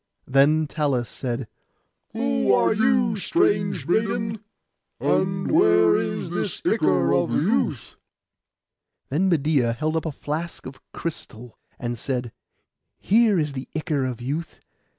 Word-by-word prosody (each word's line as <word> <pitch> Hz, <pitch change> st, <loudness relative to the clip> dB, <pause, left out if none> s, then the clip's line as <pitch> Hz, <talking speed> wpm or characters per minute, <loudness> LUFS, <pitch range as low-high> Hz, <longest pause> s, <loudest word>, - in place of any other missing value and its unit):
Then 145 Hz, +4 st, +3 dB
Talus 145 Hz, -6 st, -1 dB
said, 120 Hz, -2 st, -4 dB, 0.7 s
'Who 70 Hz, -1 st, +1 dB
are 95 Hz, -, +3 dB
you, 240 Hz, -1 st, +2 dB
strange 195 Hz, -, +1 dB
maiden, 215 Hz, +2 st, -1 dB, 0.6 s
and 185 Hz, 0 st, 0 dB
where 85 Hz, 0 st, +5 dB
is -, -, -2 dB
this -, -, -2 dB
ichor -, -, +2 dB
of -, -, +2 dB
youth?' -, -, 0 dB, 1.1 s
Then 180 Hz, +8 st, +1 dB
Medeia 145 Hz, -7 st, +2 dB
held 155 Hz, +6 st, -2 dB
up 160 Hz, 0 st, -1 dB
a -, -, -2 dB
flask 155 Hz, +4 st, -5 dB
of 135 Hz, +1 st, -10 dB
crystal, 125 Hz, -8 st, -7 dB, 0.2 s
and 120 Hz, -2 st, -4 dB
said, 125 Hz, -3 st, -3 dB, 0.7 s
'Here 220 Hz, -1 st, +3 dB
is 150 Hz, -3 st, -1 dB
the 130 Hz, -1 st, -7 dB
ichor 155 Hz, -3 st, -1 dB
of 125 Hz, -2 st, -4 dB
youth. 150 Hz, +6 st, -4 dB
150 Hz, 125 wpm, -23 LUFS, 125-185 Hz, 1.1 s, where